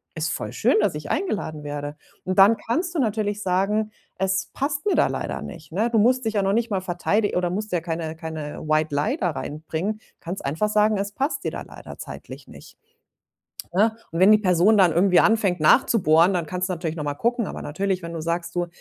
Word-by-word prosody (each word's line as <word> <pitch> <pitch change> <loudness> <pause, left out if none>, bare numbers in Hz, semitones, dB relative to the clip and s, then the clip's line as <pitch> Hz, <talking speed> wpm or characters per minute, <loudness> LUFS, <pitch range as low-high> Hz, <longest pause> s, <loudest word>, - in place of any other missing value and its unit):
„Ist 160 -1 -1
voll - - -4
schön, 240 +2 +2
dass 205 -6 +1
ich 150 -1 -5
eingeladen 175 - -2
werde.“ 145 0 -5 0.3
Und 185 +1 -1
dann 200 +4 +8
kannst 335 - -2
du - - 0
natürlich 210 -3 -1
sagen: 195 +4 0 0.3
„Es 190 0 0
passt 280 +1 -2
mir 410 - +3
da - - +4
leider - - -4
nicht, 160 -4 -10
ne?“ 220 +6 +1
Du 225 - +3
musst 255 +4 +3
dich 220 - -1
ja 205 - +3
noch 195 +1 +1
nicht 230 +1 0
mal 195 -2 0
verteidi 190 +4 0
oder 180 -1 +1
musst 210 +3 -4
ja 175 - +1
keine 165 -1 -4
keine 160 -2 -6
White 155 -1 +1
Lie 145 +1 0
da 180 - 0
reinbringen. 160 +8 -4 0.2
Kannst 175 +3 -6
einfach 160 +10 0
sagen, 215 0 +3
es 200 +1 -3
passt 275 +8 -2
dir - - -2
da - - -6
leider - - -11
zeitlich - - -9
nicht. - - -14 1.0
Ne? 215 +4 +3 0.2
Und 165 - -3
wenn 190 +3 +7
die 215 - +8
Person 190 +1 +3
dann 185 -4 +5
irgendwie 180 +2 +4
anfängt 205 -5 +2
nachzubohren, 170 - +4
dann 175 -3 -1
kannst 180 +4 -3
du - - 0
natürlich 165 -2 -4
noch 155 - -4
mal 145 -1 -2
gucken. 235 - 0
Aber - - -6
natürlich, 185 +4 -2
wenn 170 0 -6
du 165 - -4
sagst: 170 +1 -3
„Du, 175 0 0
185 Hz, 220 wpm, -23 LUFS, 165-215 Hz, 1.0 s, dann